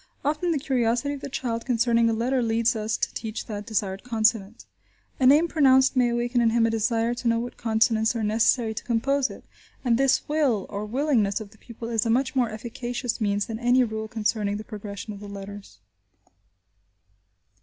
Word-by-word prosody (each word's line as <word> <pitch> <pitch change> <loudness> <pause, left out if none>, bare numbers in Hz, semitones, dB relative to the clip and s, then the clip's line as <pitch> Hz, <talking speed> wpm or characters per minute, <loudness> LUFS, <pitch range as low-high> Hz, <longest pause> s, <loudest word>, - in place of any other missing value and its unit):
Often 305 +4 0
the 320 - +1
curiosity 260 -1 0
of 280 - -7
the 280 - -6
child 235 -3 -3
concerning 235 -2 +2
a - - +1
letter 250 +3 0
leads 230 0 +1
us 215 0 -2
to - - -2
teach 220 -1 -5
that 210 -1 -6
desired 195 -3 -2
consonant; 225 -2 0 0.5
a 255 - +4
name 300 +5 +6
pronounced 265 -4 +4
may 250 -2 +3
awaken 240 +1 0
in 230 - +4
him 230 0 +3
a 230 - +1
desire 225 +1 0
to 240 0 -4
know 230 0 +3
what 240 +1 -4
consonants 220 0 +1
are 225 - -2
necessary 220 +2 +2
to 220 - -6
compose 260 +3 +1
it, - - -11 0.4
and 235 -1 +2
this 270 -1 +2
will, 285 -9 +1
or 205 0 -5
willingness, 240 -5 +1
of 210 -2 -9
the 215 - -20
pupil 230 -1 -9
is 230 -1 0
a 230 - -1
much 260 +4 +1
more 245 -3 +2
efficacious 240 +2 -4
means 205 -1 +1
than 225 -1 -6
any 245 +1 +4
rule 220 -2 -4
concerning 210 -2 -1
the 215 - -7
progression 210 -1 -7
of 200 - -10
the 205 0 -9
letters. 200 - -9
230 Hz, 195 wpm, -25 LUFS, 215-250 Hz, 0.5 s, name